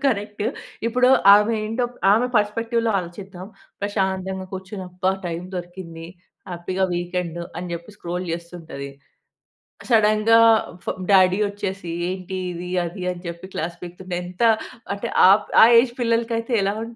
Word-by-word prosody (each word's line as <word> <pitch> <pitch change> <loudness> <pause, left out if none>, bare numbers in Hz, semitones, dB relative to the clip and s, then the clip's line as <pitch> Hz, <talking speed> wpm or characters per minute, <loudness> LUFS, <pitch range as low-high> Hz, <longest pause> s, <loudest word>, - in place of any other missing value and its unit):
Correct? 210 -3 -1 0.4
ఇప్పుడు 250 +2 +3 0.3
ఆమె 210 +2 +3
ఏంటో, 225 +3 -1 0.3
ఆమె 235 +4 +3
పర్స్పెక్టివ్‌లో 230 +2 0
ఆలోచిద్దాం. 185 +1 -8 0.4
ప్రశాంతంగా 190 -2 -2
కూర్చొని 190 +1 -6
అబ్బా! 185 +1 0
టైమ్ 170 +1 -4
దొరికింది. 175 -2 -8 0.4
హ్యాపీగా, 185 +2 -1
వీకెండ్ 175 -1 -3 0.2
అని 180 -1 -6
చెప్పి 170 +5 -9
స్క్రోల్ 180 +1 -4
చేస్తుంటది, 165 -5 -7 0.9
క్ - - -15
సడెన్‌గా 215 +1 +5 0.5
ఫా - - 0 0.2
డ్యాడీ 185 0 +5
వచ్చేసి, 195 -3 -5 0.2
ఏంటి 185 0 -5
ఇది 175 +1 -6 0.2
అది 180 +2 -6
అని 175 -1 -8
చెప్పి 170 +2 -7
క్లాస్ 170 +2 -3
పికుతుంటే, 180 +1 -7
ఎంత 180 +4 -9 0.5
అంటే, 200 - -5 0.2
ఆప్ 200 +2 +4 0.2
ఆ - - +10 0.2
ఏజ్ 240 -1 -3
పిల్లలకయితే 230 0 0
ఎలా 200 +1 +1
ఉంట 230 0 -9
190 Hz, 135 wpm, -22 LUFS, 175-210 Hz, 0.9 s, ఆ